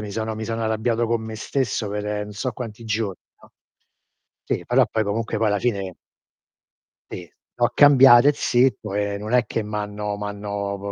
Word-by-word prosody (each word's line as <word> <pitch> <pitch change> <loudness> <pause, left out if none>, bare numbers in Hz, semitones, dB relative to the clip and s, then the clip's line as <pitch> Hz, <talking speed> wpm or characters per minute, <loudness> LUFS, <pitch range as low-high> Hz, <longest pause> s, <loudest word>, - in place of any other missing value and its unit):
mi 105 -1 -6
sono 110 +1 -3
mi 110 0 -5
sono 115 0 -3
arrabbiato 115 +1 0
co' 115 0 0
me 110 0 -7
stesso 120 -2 -2
per 105 0 -3
n' 105 - -9
so 130 +5 -3
quanti 115 -2 -8
gio 105 -3 -2 0.3
no. - - -18 0.9
Sì, - - -3
però - - +4
poi 110 -1 0
comunque 110 +2 -2
poi 110 - +1
alla 105 -1 +1
fine 100 -7 -2 1.2
Sì, 90 -2 -8 0.3
l'ho 120 0 +2
cambiate 135 -1 +7
zitto, 120 -5 +1
e 100 0 -1
non 105 +2 -6
è 125 -1 +4
che 115 - -2
m'hanno 105 0 -4
m'hanno 100 -1 -4
110 Hz, 170 wpm, -22 LUFS, 105-115 Hz, 1.2 s, cambiate